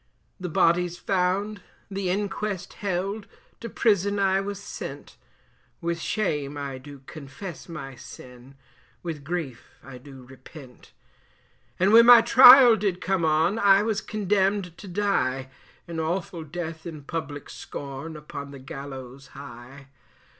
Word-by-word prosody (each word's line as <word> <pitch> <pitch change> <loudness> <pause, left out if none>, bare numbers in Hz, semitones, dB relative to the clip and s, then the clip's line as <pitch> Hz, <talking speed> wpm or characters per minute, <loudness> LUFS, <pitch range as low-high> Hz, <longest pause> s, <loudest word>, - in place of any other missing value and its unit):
The 180 -1 -4
body's 175 +2 +2
found, 195 +3 -1 0.3
the 195 -1 -2
inquest 200 0 -3
held, 200 +2 -2 0.3
to 230 - -7
prison 205 -3 +1
I 195 -1 +2
was 200 0 -5
sent, 145 -7 -8 0.6
With 170 0 -2
shame 150 -8 -2
I 140 -2 -5
do 140 0 -13
confess 155 +5 -9
my 135 -5 -7
sin, 125 +2 -13 0.5
with 160 -5 -5
grief 150 -6 -5
I 130 -2 -11
do 135 0 -13
repent; 130 +1 -14 0.9
And 190 +3 +3
when 230 +1 +8
my 240 -1 +10
trial 245 0 +9
did 195 -3 -1
come 190 -2 -1
on, 160 +6 +2
I 200 -1 +5
was 220 -1 -1
condemned 195 -3 0
to 205 - -10
die, 175 -9 -1 0.4
An 165 -1 -5
awful 170 +1 -3
death 160 +1 -6
in 155 -3 -8
public 145 -1 -5
scorn, 140 +3 -8
upon 140 -1 -8
the 140 - -10
gallows 135 -1 -9
high. 135 +1 -11
170 Hz, 130 wpm, -25 LUFS, 140-195 Hz, 0.9 s, my